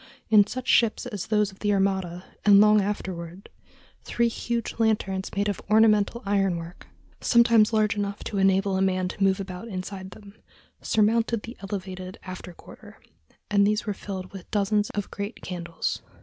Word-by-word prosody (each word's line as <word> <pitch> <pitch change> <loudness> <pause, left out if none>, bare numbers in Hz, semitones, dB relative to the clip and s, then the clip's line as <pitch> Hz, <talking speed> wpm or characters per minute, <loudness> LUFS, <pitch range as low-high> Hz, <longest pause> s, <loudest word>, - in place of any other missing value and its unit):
In 210 -2 +7
such 255 +3 -6
ships 230 0 +3
as 210 -7 -5
those 210 -2 +1
of 195 - -19
the 205 - 0
Armada, 190 -3 0 0.2
and 200 -1 +7
long 210 0 +6
afterward, 185 -2 -5 0.5
three 235 0 +1
huge 235 0 -4
lanterns 195 -4 0
made 200 +1 0
of 205 - -2
ornamental 215 +1 +3
iron 195 -3 +1
work, 170 +1 -10 0.3
sometimes 235 -2 +4
large 215 -2 +2
enough 205 0 -3
to 200 - -3
enable 195 0 +2
a - - 0
man 185 -1 +1
to 195 - -3
move 190 0 +3
about 190 +2 -6
inside 190 -1 -6
them, 200 +1 -14 0.5
surmounted 225 +1 +1
the 235 - -8
elevated 190 -2 -6
after 185 -1 -8
quarter; 170 - -15 0.5
and 200 -1 +4
these 210 +2 0
were 210 - -1
filled 190 -1 -7
with 190 -3 -10
dozens 205 0 +1
of 205 -1 -3
great 200 +3 -6
candles. 170 -2 -4
200 Hz, 165 wpm, -25 LUFS, 190-215 Hz, 0.5 s, In